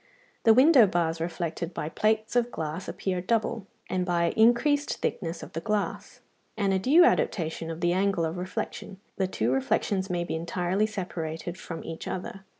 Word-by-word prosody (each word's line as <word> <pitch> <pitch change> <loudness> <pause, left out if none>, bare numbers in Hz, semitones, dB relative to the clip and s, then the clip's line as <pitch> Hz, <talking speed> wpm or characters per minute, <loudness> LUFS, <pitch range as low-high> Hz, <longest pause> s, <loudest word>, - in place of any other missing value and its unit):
The 225 - +8
window 260 -3 +7
bars 165 -2 0
reflected 170 0 -3
by 150 - -3
plates 215 +6 0
of 245 0 +2
glass 160 -2 -5
appear 185 -2 -2
double, 225 +1 -1 0.2
and 185 -1 -1
by 170 -1 +1
increased 245 +6 +3
thickness 165 -2 -3
of - - -11
the 165 - -3
glass, 210 +2 -3 0.4
and 200 -3 +1
a 190 - +2
due 295 - +6
adaptation 165 - 0
of 165 0 -6
the 175 0 +2
angle 190 -2 +1
of 160 +2 -3
reflection, 185 +1 -5 0.2
the 190 - +1
two 120 -9 -1
reflections 190 - 0
may 175 -1 -1
be - - -4
entirely 175 +5 0
separated 175 -5 -5
from 165 -3 -7
each 165 0 -7
other. 195 +1 -5
185 Hz, 170 wpm, -27 LUFS, 165-215 Hz, 0.4 s, The